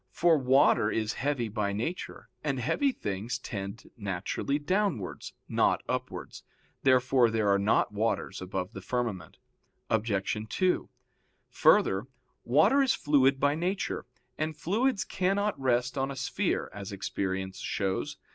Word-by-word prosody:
For 170 -2 +3
water 130 -5 +4
is 110 -1 -1
heavy 135 -4 0
by 100 -1 -2
nature, 120 - -4 0.2
and 140 -3 -1
heavy 275 - +1
things 105 - -3
tend 100 -4 -6
naturally 100 +6 -2
downwards, 165 - -1
not - - +2
upwards. - - -4 0.4
Therefore 130 -2 +4
there 110 -2 +1
are 100 0 +4
not 105 +2 +2
waters 105 -2 -1
above 95 +2 -4
the 95 - -7
firmament. 115 -2 -3 0.5
Obj. 105 -2 0
2: 185 +7 +1 0.6
Further, 95 +6 +4 0.4
water 155 - +4
is 265 -2 +3
fluid 135 -2 +3
by 145 +1 +3
nature, 180 +1 -2 0.3
and 155 0 -2
fluids 210 +6 +1
cannot 200 +1 0
rest 125 +1 +1
on 135 +1 0
a 140 - -5
sphere, 130 0 -1
as 100 0 -7
experience 95 -1 -3
shows. 95 -1 -2
125 Hz, 130 wpm, -29 LUFS, 100-150 Hz, 0.6 s, water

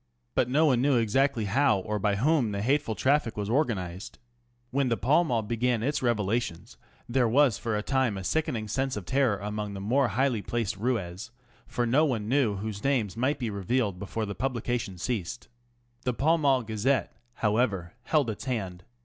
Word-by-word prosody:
But 125 - +1
no 150 +5 +3
one 130 -5 +3
knew 140 0 +3
exactly 115 +1 +1
how 130 +2 +3
or 105 +2 -3
by 100 0 +1
whom 125 -1 +2
the 100 0 -2
hateful 135 -2 +1
traffic 130 -3 +1
was 105 +1 -2
organised. 100 - -1 0.5
When 135 0 +1
the 115 - +1
Pall 150 +7 +3
Mall 120 -8 0
began 120 +1 0
its 145 +3 0
revelations 110 -6 -1 0.3
there 120 0 +2
was 135 -1 +3
for 115 -2 -1
a 105 - -3
time 130 -6 +1
a 95 - -5
sickening 115 -3 -1
sense 130 +3 -1
of 100 - -6
terror 130 -4 +2
among 105 0 -4
the - - -5
more 125 +7 +2
highly 120 +1 +1
placed 115 -2 -2
routs, 105 -2 -2 0.4
for 120 - -1
no 130 +7 +3
one 115 -9 0
knew 125 -4 +2
whose 105 +1 -5
names 125 -8 0
might 130 +5 0
be 120 -4 -3
revealed 100 0 -1
before 110 +3 -3
the 100 - -4
publication 120 -5 -2
ceased. 115 +3 -4 0.5
The 125 -1 -1
Pall 160 +6 +2
Mall 135 -4 +3
Gazette^ 110 +5 0 0.3
however, 105 -5 0
held 145 -7 +2
its 105 - -8
hand. 95 -8 -3
115 Hz, 185 wpm, -28 LUFS, 105-130 Hz, 0.5 s, no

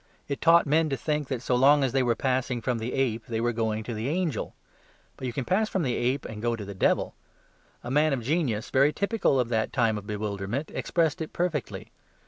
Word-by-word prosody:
It 140 - -4
taught 170 +1 +6
men 155 +2 +2
to 135 - -1
think 150 +2 -2
that 130 -3 -3
so - - 0
long 140 +3 +5
as 130 - +1
they 135 - +2
were 120 -2 +2
passing 130 -1 0
from 120 +1 -1
the 115 +3 -4
ape 120 -4 -1
they 115 -1 -2
were 120 +1 0
going 110 -1 -1
to 120 - -5
the 110 +4 -3
angel. 165 - -2 0.6
But 130 - -5
you - - -2
can 125 +2 -3
pass 215 +4 +1
from 190 - -1
the 125 -4 0
ape 125 +3 0
and 105 -2 -7
go 120 0 0
to 105 -3 -7
the 100 - -7
devil. 95 - +1 0.7
A 120 - -5
man 150 +3 +3
of 130 -4 -1
genius, 130 -6 -1
very 140 +3 +4
typical 200 - +1
of 120 -2 0
that 110 -2 0
time 115 -5 +1
of 100 - -14
bewilderment, 105 +6 -3
expressed 165 -1 0
it 160 - -5
perfectly. 170 -8 -3
130 Hz, 230 wpm, -27 LUFS, 115-150 Hz, 0.7 s, taught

